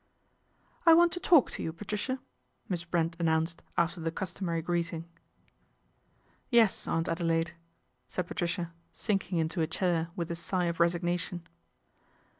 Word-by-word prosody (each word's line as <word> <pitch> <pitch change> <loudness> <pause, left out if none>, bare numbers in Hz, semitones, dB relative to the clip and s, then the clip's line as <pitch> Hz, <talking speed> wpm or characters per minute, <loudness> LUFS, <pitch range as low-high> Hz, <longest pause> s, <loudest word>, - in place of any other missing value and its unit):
" - - -36
I 330 - +10
want 345 0 +6
to 355 - -3
talk 335 -7 +5
to - - -5
you, 160 - -2
Patricia," 210 +8 -3 0.5
Miss 175 -3 -2
Brent 165 -1 0
announced 165 0 +1 0.2
after 170 +1 +1
the 165 - 0
customary 170 -2 -3
greeting. 170 -1 -1
1 170 - -25 1.4
Yes, 230 -5 +4
Aunt 165 0 +1
Adelaide/' 165 0 0 0.5
said 180 - -2
Patricia, 175 -2 -2 0.2
sinking 195 -4 -1
into 165 +2 0
a 160 - +2
chair 170 0 0
with 170 -1 -3
a - - -1
sigh 180 +1 -1
of 170 -1 -2
resignation. 175 0 0
170 Hz, 145 wpm, -30 LUFS, 165-190 Hz, 1.4 s, I